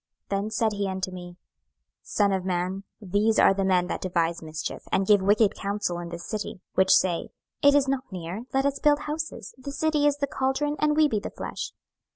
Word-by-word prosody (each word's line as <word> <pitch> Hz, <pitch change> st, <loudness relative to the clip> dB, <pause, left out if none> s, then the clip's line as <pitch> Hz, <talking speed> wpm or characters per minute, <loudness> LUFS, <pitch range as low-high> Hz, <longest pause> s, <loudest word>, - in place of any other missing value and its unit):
26:011:002 195 Hz, 0 st, +1 dB
Then 210 Hz, -, -3 dB
said 220 Hz, 0 st, +1 dB
he 200 Hz, -1 st, -1 dB
unto 190 Hz, 0 st, -3 dB
me, 175 Hz, -1 st, -9 dB, 0.6 s
Son 200 Hz, -2 st, +1 dB
of 190 Hz, -1 st, -1 dB
man, 185 Hz, +1 st, -2 dB
these 210 Hz, +2 st, +1 dB
are -, -, +6 dB
the 195 Hz, 0 st, -1 dB
men 185 Hz, -2 st, +3 dB
that -, -, -4 dB
devise 170 Hz, -2 st, 0 dB
mischief, 155 Hz, -1 st, -5 dB
and 190 Hz, -, +2 dB
give 205 Hz, -1 st, +5 dB
wicked 205 Hz, +2 st, +4 dB
counsel 200 Hz, -3 st, -2 dB
in 170 Hz, -1 st, -6 dB
this 170 Hz, 0 st, -7 dB
city: 215 Hz, -1 st, -4 dB
26:011:003 -, -, -20 dB
Which 190 Hz, 0 st, +3 dB
say, 175 Hz, -3 st, +1 dB, 0.3 s
It 285 Hz, 0 st, +6 dB
is 280 Hz, -1 st, +4 dB
not 265 Hz, -4 st, -2 dB
near; 185 Hz, +5 st, -5 dB
let 270 Hz, +1 st, +1 dB
us 280 Hz, 0 st, 0 dB
build 295 Hz, 0 st, +3 dB
houses: 310 Hz, +1 st, -5 dB
this 280 Hz, +2 st, -7 dB
city 305 Hz, -2 st, +2 dB
is 290 Hz, -1 st, +2 dB
the 285 Hz, -, 0 dB
caldron, 275 Hz, +2 st, -1 dB
and 300 Hz, 0 st, +2 dB
we 310 Hz, -1 st, +6 dB
be 220 Hz, -7 st, 0 dB
the -, -, -6 dB
flesh. -, -, -5 dB
205 Hz, 215 wpm, -26 LUFS, 185-270 Hz, 0.6 s, are